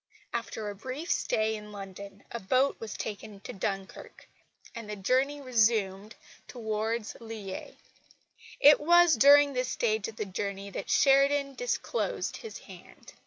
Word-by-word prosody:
After 225 -2 -4
a 205 - -4
brief 260 - -5
stay 220 0 +1
in 210 0 -9
London 200 0 -9
a 235 - -4
boat 255 +8 +2
was 220 -2 -6
taken 205 -1 -6
to 250 - -8
Dunkirk, 195 -1 -5 0.5
and 230 -2 -8
the 210 - -4
journey 260 +8 +1
resumed 215 -5 +1 0.3
towards 220 -1 -3
Lille. 220 -4 -7 0.8
It 290 +1 +8
was 345 +2 +5
during 285 +4 +6
this 255 0 -1
last 255 - -3
stage 220 -4 0
of 225 - -9
the 215 - -3
journey 200 +1 -5
that - - -6
Sheridan 275 0 +4
disclosed - - -2
his 450 - -8
hand. - - -14
225 Hz, 145 wpm, -29 LUFS, 205-270 Hz, 0.8 s, It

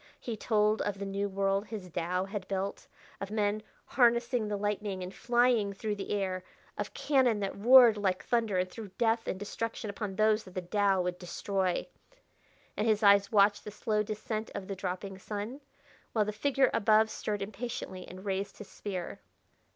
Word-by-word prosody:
He 235 - -4
told 215 0 +2
of 205 -1 -2
the 200 - -4
new 200 +1 -2
world 195 +1 0
his 210 -5 -6
Tao 180 +3 -1
had 195 -1 -5
built, 195 0 -3 0.3
of 195 - -4
men 210 0 0 0.2
harnessing 235 -2 +2
the 205 -1 -2
lightning 205 -2 -2
and 180 +1 -7
flying 240 -4 +2
through 210 +2 -3
the 200 -1 -6
air; 190 -3 -1 0.3
of - - -5
cannon 260 -7 +3
that 195 - -2
roared 235 +1 +7
like 190 -3 0
the - - -26
thunder 225 -5 +1
and 180 0 +1
threw 215 +3 -8
death 225 -1 +1
and - - -2
destruction 220 +1 -4
upon 200 -1 -5
those 215 +1 +3
that 185 - -13
the 185 - -1
Tao 195 0 +2
would 180 0 -3
destroy.... 185 0 -1 0.9
And 210 - 0
his 215 -1 +2
eyes 200 +1 +6
watched 205 -1 +4
the - - -6
slow 210 +1 -1
descent 215 +1 -4
of 190 - -5
the 195 - -4
dropping 190 +1 -5
sun, 215 +8 -5 0.5
while 215 -2 +2
the 210 - -3
figure 270 +4 +2
above 215 +1 +4
stirred 205 -2 -3
impatiently 200 -3 -6
and 185 +2 -10
raised 195 0 -2
his 210 - -10
spear. 185 -4 -5
205 Hz, 180 wpm, -31 LUFS, 195-220 Hz, 0.9 s, roared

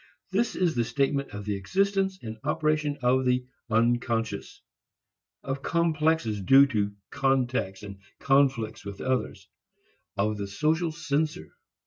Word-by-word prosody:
This 220 +5 0
is 175 -3 +1
the 120 - +1
statement 140 +4 0
of 105 0 -7
the 105 -1 -1
existence 195 - 0
and 110 -1 -7
operation 150 0 0
of 130 +2 +3
the 125 0 +1 0.2
"unconscious," 115 0 0 0.8
of 135 0 -3
complexes 160 -8 +1
due 135 +8 +7
to 100 -3 -1 0.2
contacts 125 -8 0
and 100 -1 -9 0.2
conflicts 135 -6 +2
with 100 0 -8
others, 130 0 -2 0.7
of 105 +1 0
the 100 - -3
social 160 - 0
censor. 150 - -2
130 Hz, 125 wpm, -27 LUFS, 110-155 Hz, 0.8 s, due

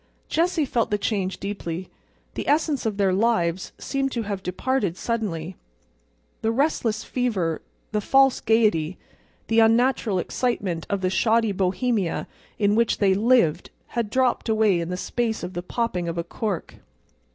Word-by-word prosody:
Jessie 335 -1 +1
felt 240 -3 0
the 210 - +1
change 195 -3 -2
deeply. 185 -3 -5 0.4
The - - -5
essence 295 -4 +1
of 210 -2 -2
their 195 -2 +2
lives 190 -4 +1
seemed 275 -1 -2
to 235 - -1
have 200 -2 -4
departed 190 0 -1
suddenly. 185 -8 -3 0.8
The 220 - +1
restless 230 -4 0
fever, 200 -11 -1 0.3
the 210 -1 0
false 270 +3 +4
gayety, 210 -7 +2 0.5
the 225 0 +2
unnatural 225 -2 +3
excitement 185 -5 -2
of 200 -1 -1
the 185 0 0
shoddy 225 +2 +2
Bohemia 195 0 0 0.3
in 205 -1 +2
which 230 +1 +2
they 200 - +3
had 190 - +3
lived 210 -9 +3 0.2
had 235 -3 -2
dropped 255 -1 +1
away 215 -5 +3
in 170 0 -3
the 180 - -3
space 225 +2 -2
of 180 +1 -5
the 175 - -3
popping 180 -2 -2
of 170 0 -3
a 170 - 0
cork. 195 +1 -4
210 Hz, 155 wpm, -24 LUFS, 185-235 Hz, 0.8 s, false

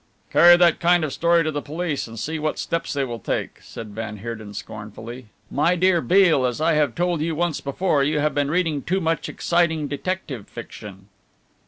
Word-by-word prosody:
"Carry 175 0 +8
that 175 -2 +4
kind 175 0 +3
of 150 -4 -2
story 170 0 +3
to 155 - -1
the 145 -1 -3
police 155 -2 -3
and 115 0 -10
see 160 +7 -3
what 155 0 -2
steps 165 - -2
they 140 -1 -1
will 120 -3 -5
take," - - -3
said 110 - -9
van 110 0 -6
Heerden 110 -1 -7
scornfully. 110 +4 -8 0.2
"My 170 +5 +2
dear 180 -1 +3
Mr. 120 - -10
Beale, 175 -7 +4
as 120 +1 -4
I 160 +1 +2
have 150 -5 +1
told 175 -2 0
you 160 0 -1
once 170 -1 -1
before, 145 +1 0
you 150 +2 +1
have 150 0 +1
been 145 0 0
reading 160 -3 0
too 185 +6 -1
much 165 -4 -1
exciting 170 -3 0
detective 145 - -4
fiction." 105 -4 -10
150 Hz, 200 wpm, -23 LUFS, 120-170 Hz, 0.2 s, Carry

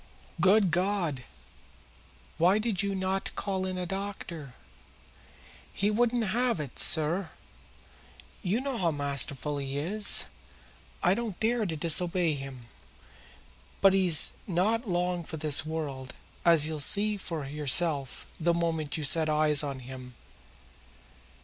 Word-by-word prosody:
"Good 195 0 +4
God! 175 - -1 1.1
Why 180 +5 +4
did 215 -3 -1
you 200 -1 -2
not 190 0 -2
call 190 -2 -2
in 185 0 -4
a 180 - -2
doctor?" 175 -7 -6 1.2
"He 205 +1 0
wouldn't 240 +2 +1
have 240 -2 0
it, 145 -4 -6
sir. 165 +3 +3 1.1
You 210 +5 0
know 270 -3 -3
how 175 -3 +2
masterful 145 0 -2
he 135 0 -4
is. 200 +8 +4 0.8
I 180 - +4
didn't 220 -3 -4
dare 225 -1 +1
to 165 - -3
disobey 170 +1 +1
him. 135 -3 -7 1.2
But 195 -1 +5
he's 180 -5 +1
not 210 +6 0
long 175 0 -1
for 160 - -7
this 155 0 +2
world, 140 -5 -5 0.3
as 165 -3 +5
you'll 155 -1 -3
see 210 +8 +3
for 165 -7 -5
yourself 145 0 +2
the 170 +1 +2
moment 165 -3 -1
that - - -3
you 155 - -4
set 155 +2 +3
eyes 150 -1 +3
on 140 -3 -4
him." 125 -1 -10
170 Hz, 130 wpm, -28 LUFS, 150-195 Hz, 1.2 s, But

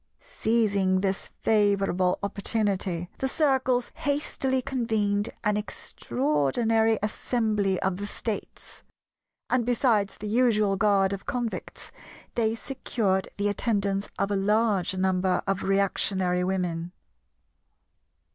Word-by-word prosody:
Seizing 200 -5 +2
this 195 -1 -1
favourable 200 -4 +2
opportunity, 200 -3 0
the 265 - 0
Circles 265 -4 +1
hastily 285 -3 -1
convened 220 -5 0
an 210 -1 +2
extraordinary 205 - 0
Assembly 210 -3 0
of 190 -1 0
the 205 +1 -4
States; 215 0 -6 0.7
and 255 -1 +1
besides 230 -4 +1
the 210 - -6
usual 215 -3 +3
guard 195 -1 +3
of 195 - -7
Convicts, 245 -5 -4 0.4
they 225 -1 +1
secured 220 -6 -1
the 205 0 +1
attendance 200 -1 0
of 200 +1 0
a - - +1
large 200 -2 +1
number 185 0 +1
of 195 -1 -1
reactionary 190 -2 +1
Women. 180 -2 -2
205 Hz, 105 wpm, -26 LUFS, 190-225 Hz, 0.7 s, usual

